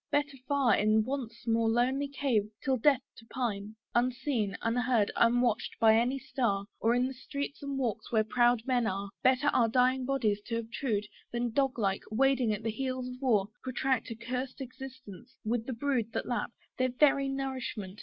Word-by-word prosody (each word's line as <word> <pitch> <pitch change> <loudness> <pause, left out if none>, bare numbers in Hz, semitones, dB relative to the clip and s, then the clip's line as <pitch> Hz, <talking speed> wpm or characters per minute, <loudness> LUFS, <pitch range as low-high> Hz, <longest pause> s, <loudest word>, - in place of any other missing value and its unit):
better 290 -1 +1
far 275 -6 +3
In 215 +1 +3
Want's 250 -3 -5
most 225 -1 +2
lonely 260 +4 +1
cave 260 -7 0
till 265 - +2
death 265 +1 +3
to 225 - -14
pine, 215 -5 -3 0.2
Unseen, 240 -3 0
unheard, 230 -2 +2
unwatched 235 -1 +2
by 220 -1 +6
any 245 +4 +2
star; 240 -7 -1
Or 230 +2 +3
in 245 +1 +2
the 265 - -5
streets 280 +2 -5
and 280 -1 -3
walks 245 -6 -2
where 220 -2 +3
proud 240 +1 +3
men 250 -3 +1
are, 195 0 -3
Better 260 +3 +4
our 235 -4 +3
dying 255 +2 +2
bodies 225 -7 +1
to 230 - -1
obtrude, 225 -2 -2 0.3
Than 240 0 -1
dog 270 -1 +1
like, 195 -4 0
wading 260 0 +2
at 210 +1 -3
the 225 - 0
heels 255 +2 -3
of 250 +1 -9
war, 215 -7 +2
Protract 260 -1 -1
a 230 - -5
curst 250 +3 -4
existence, 260 -4 -10
with 230 +1 -1
the 260 - -2
brood 240 -3 -1
That - - -2
lap 240 -4 -1 0.3
(their 255 0 +3
very 275 +1 +3
nourishment!) 260 -8 -4
245 Hz, 180 wpm, -30 LUFS, 225-265 Hz, 0.3 s, by